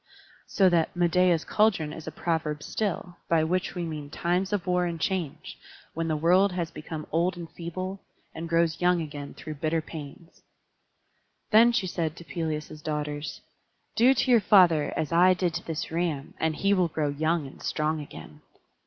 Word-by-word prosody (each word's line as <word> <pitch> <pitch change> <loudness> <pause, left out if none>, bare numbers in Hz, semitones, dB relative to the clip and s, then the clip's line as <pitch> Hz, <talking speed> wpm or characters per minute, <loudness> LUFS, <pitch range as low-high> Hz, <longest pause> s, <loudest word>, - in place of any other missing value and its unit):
So 195 - +3
that 170 -1 +1
"Medeia's 175 -1 +3
cauldron" 195 -9 +2
is 160 -1 -9
a - - -3
proverb 155 -2 -2
still, 190 -4 -3
by 165 -2 +3
which 180 +4 -1
we 175 - -2
mean 150 -3 -6
times 180 +4 -1
of 205 -4 -1
war 180 -1 +1
and 170 -1 -4
change, 175 -4 -3 0.3
when 165 0 -2
the 155 -1 0
world 180 +5 +4
has 170 -2 -3
become 155 0 -7
old 175 +3 +1
and 170 -1 -7
feeble, 185 +3 -5 0.3
and 165 +1 -6
grows 165 0 +1
young 180 0 +3
again 145 -3 -6
through 155 -2 -8
bitter 160 +1 +1
pains. 160 +1 -10 1.1
Then 230 +2 +7
she 225 -5 0
said 165 -3 -2
to 170 - -11
Pelias's 155 0 -4
daughters: 150 -1 -4 0.5
"Do 255 +4 +5
to 255 - +1
your 235 -2 +6
father 180 -6 +5
as 155 - -2
I 180 +2 +5
did 180 -2 0
to - - -5
this 165 0 -4
ram, 160 -4 -2
and 160 -1 0
he 195 +4 +2
will 185 -3 +3
grow 155 -2 -1
young 155 +2 0
and 135 - -12
strong 155 0 -1
again." 80 - -11
165 Hz, 180 wpm, -27 LUFS, 155-180 Hz, 1.1 s, Then